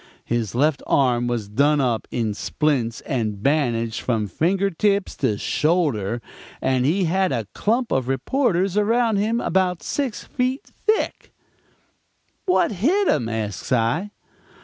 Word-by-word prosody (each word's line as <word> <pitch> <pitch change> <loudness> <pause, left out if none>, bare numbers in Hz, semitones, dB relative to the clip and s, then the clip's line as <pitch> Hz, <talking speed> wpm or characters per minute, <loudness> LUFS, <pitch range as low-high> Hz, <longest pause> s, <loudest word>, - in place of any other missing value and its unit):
His 115 -3 -2
left 145 +2 +2
arm 120 -3 +2
was 120 -4 -2
done 145 +8 +2
up 120 -5 0
in 115 -3 -1
splints 120 0 -1
and 110 -7 -3
bandaged 120 -6 +1
from 110 -4 0
finger 190 - 0
tips 200 +3 0
to 115 -7 0
shoulder, 120 - 0 0.4
and 130 -1 +1
he 185 +6 +2
had 185 +1 +1
a 115 -4 -1
clump 235 +3 0
of 130 -2 0
reporters 190 - +1
around 225 +1 +2
him 220 +4 +1
about 185 -5 0
six 270 -7 -2
feet 255 +1 -2 0.2
thick. 435 0 0 1.2
"'What 365 - +3
hit 325 - +1
him?' 115 - +1
asks 110 -4 -4
I. 125 - +1
145 Hz, 135 wpm, -22 LUFS, -, 1.2 s, What